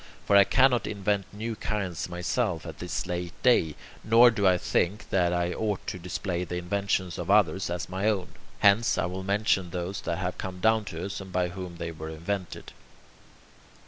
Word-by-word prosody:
For 100 - +3
I 100 0 +8
cannot 130 -2 +3
invent 100 -1 -1
new 110 +2 -4
kinds 95 -7 -3
myself 90 0 -1
at 80 -3 -8
this 90 +1 -3
late 90 -1 -4
day, 85 - +4 0.3
nor 115 +2 +7
do 100 -3 +1
I 90 -1 +5
think 90 +3 -1
that 90 -2 +2
I 90 0 0
ought 105 -3 -2
to 90 - -4
display 90 0 -3
the 90 0 -5
inventions 95 0 -1
of 85 +1 -5
others 95 -3 +3
as 90 +1 -3
my 95 +4 0
own. 100 -4 -1 0.3
Hence, 105 +3 +4
I - - +1
will 90 +1 -4
mention 100 -2 +1
those 90 +2 -4
that 85 - -2
have 90 0 -3
come 95 -1 -5
down 110 +2 +3
to 85 -2 -5
us, 100 0 -5
and 95 -1 -10
by 90 -1 0
whom 90 -1 -7
they 85 0 -4
were 80 0 -7
invented. 85 +2 -5
95 Hz, 190 wpm, -27 LUFS, 90-100 Hz, 0.3 s, I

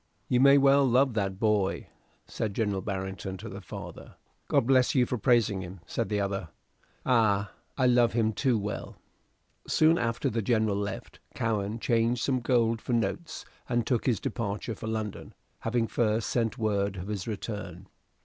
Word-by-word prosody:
"You 125 - +3
may 140 +2 +7
well 140 0 +5
love 130 0 +3
that 100 -3 -1
boy," 105 -3 +1 0.4
said 105 -3 -4
Central 105 -4 0
Barrington 95 0 -4
to 110 - -8
the 100 -1 -8
father. 90 - -9 0.3
"God - - +2
bless 130 +1 +3
you 125 -2 +4
for 125 0 -3
praising 115 -6 +2
him," 90 +1 -8
said 115 - -3
the 105 -1 0
other. 100 -3 -2 0.6
"Ay, 105 -5 +3 0.3
I 130 - +2
love 120 -1 +4
him 110 -1 +1
too 125 +2 +1
well." 105 0 -5 0.7
Soon 160 +1 +4
after 115 -1 -1
the 115 +1 -1
General 110 -2 +1
left, 100 0 -5 0.2
Cowen 110 -1 -1
changed 115 0 +1
some 130 -2 +1
gold 115 -2 +1
for 125 - -3
notes, 155 +8 -2 0.2
and 120 -2 +1
took 125 -1 0
his 120 -6 +2
departure 105 0 -3
for 110 - -7
London, 110 -2 -4 0.2
having 115 0 0
first 110 -1 0
sent 115 0 0
word 100 -3 0
of 90 - -5
his 105 -2 -4
return. 100 -4 -6
110 Hz, 170 wpm, -28 LUFS, 100-120 Hz, 0.7 s, may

